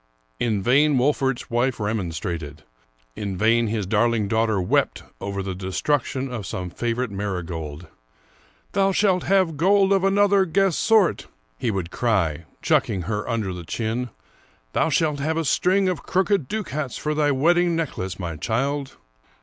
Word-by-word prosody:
In 105 -5 0
vain 140 +4 +4
Wolfert's 135 -1 0
wife 120 +2 +1
remon 105 -3 -1
strated; 80 -2 -5 0.5
in 100 -3 -4
vain 115 +3 +3
his 105 -2 -2
darling 110 +1 +1
daughter 110 -1 +1
wept 90 - 0 0.2
over 100 -1 -3
the 95 -1 -3
destruc 95 - -1
tion 130 -1 -4
of 110 -7 -5
some 90 0 -5
favorite 120 +1 -2
marigold. 90 -5 -4 0.4
" - - -33
Thou 195 0 +2
shalt 185 -2 +2
have 185 -5 +2
gold 195 +4 +4
of 195 -1 +2
another 200 0 +4
guess 190 0 +2
^ - - -2
sort," 220 -5 +3 0.3
he - - 0
would 95 -5 -3
cry, 85 -11 0 0.2
chucking 95 -3 +1
her 105 +5 -3
under 110 -5 -1
the 90 -1 -7
chin; 115 +7 -3 0.3
" - - -35
thou - - +2
shalt 155 -2 +1
have 160 +3 -1
a 165 - 0
string 185 +7 +2
of 180 -2 -1
crooked 190 -5 +1
ducats 155 - -3
for 150 - -2
thy 150 -1 +2
wedding 170 +5 +3
necklace, 95 - -3
my 85 -4 -4
child." 135 - -2
120 Hz, 165 wpm, -23 LUFS, 95-160 Hz, 0.5 s, vain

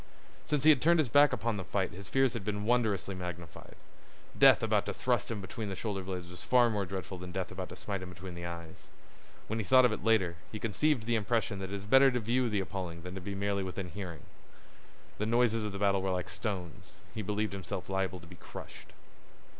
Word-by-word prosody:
Since 150 -2 0
he 155 - +9
had 140 -5 +3
turned 170 +2 +5
his 155 -6 +2
back 145 +5 +6
upon 115 0 -1
the 95 - -4
fight 95 +1 -1
his 95 +2 -10
fears 135 -2 +3
had - - -4
been 105 0 -2
wondrously 110 -5 +1
magnified. 90 -3 -8 0.6
Death - - +7
about - - +2
to - - -3
thrust - - 0
him 110 -3 -3
between 105 +2 -5
the 95 - -3
shoulder 100 0 -3
blades 90 -2 -5
was 90 -1 -8
far 120 -2 +4
more 100 -3 -1
dreadful 95 -1 -5
than 90 0 -7
death 95 0 -3
about 95 0 -5
to 90 - -8
smite 100 0 -4
him 95 - -7
between 90 +1 -8
the 85 0 -7
eyes. 85 -1 -8 0.6
When 110 +1 -3
he - - -1
thought 130 +6 +6
of 125 - +3
it 110 - -4
later, 100 -7 +2
he 110 - -4
conceived 120 +4 +1
the 120 +2 0
impression 110 -2 0
that 95 - -3
it - - -2
is 100 0 -6
better 135 +5 +7
to 125 -1 0
view 120 +2 +1
the 105 -2 0
appalling 90 -3 -5
than 90 0 -6
to 95 - -6
be 100 +2 -5
merely 100 0 0
within 95 -1 -4
hearing. 85 -3 -7 1.0
The 105 - 0
noises 115 -1 +2
of 105 - -3
the 100 - -5
battle 100 -1 +2
were 95 - -1
like 90 -1 -2
stones; 90 -1 -5
he 110 - -4
believed 105 +1 -1
himself 95 -1 -5
liable 95 -1 -1
to - - -13
be 90 +1 -13
crushed. - - -11
100 Hz, 235 wpm, -31 LUFS, 90-115 Hz, 1.0 s, he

